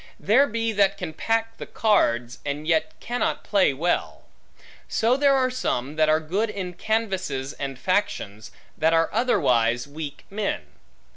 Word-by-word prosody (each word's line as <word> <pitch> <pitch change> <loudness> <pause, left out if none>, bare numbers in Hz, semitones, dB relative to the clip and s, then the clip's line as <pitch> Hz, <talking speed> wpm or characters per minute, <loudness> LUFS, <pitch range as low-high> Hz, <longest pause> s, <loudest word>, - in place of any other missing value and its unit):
There 255 +8 +4
be, 230 -1 -1
that 200 -2 +2
can 175 -4 -5
pack 225 +5 -1
the - - -7
cards, 120 - +1
and 145 +2 -4
yet 160 -1 0
cannot 240 -1 -2
play 200 -7 +3
well; 165 +6 -1 0.6
so 230 +3 +2
there 280 0 +4
are 255 -1 +2
some 145 - -2
that 155 0 +3
are 155 0 +4
good 190 +8 -1
in 185 -4 -5
canvasses 185 -10 -2
and 135 -2 -5
factions, 120 - -2 0.3
that 160 +1 +2
are 165 0 +2
otherwise 125 - +2
weak 145 0 -7
men. 205 0 -2
180 Hz, 150 wpm, -24 LUFS, 145-225 Hz, 0.6 s, There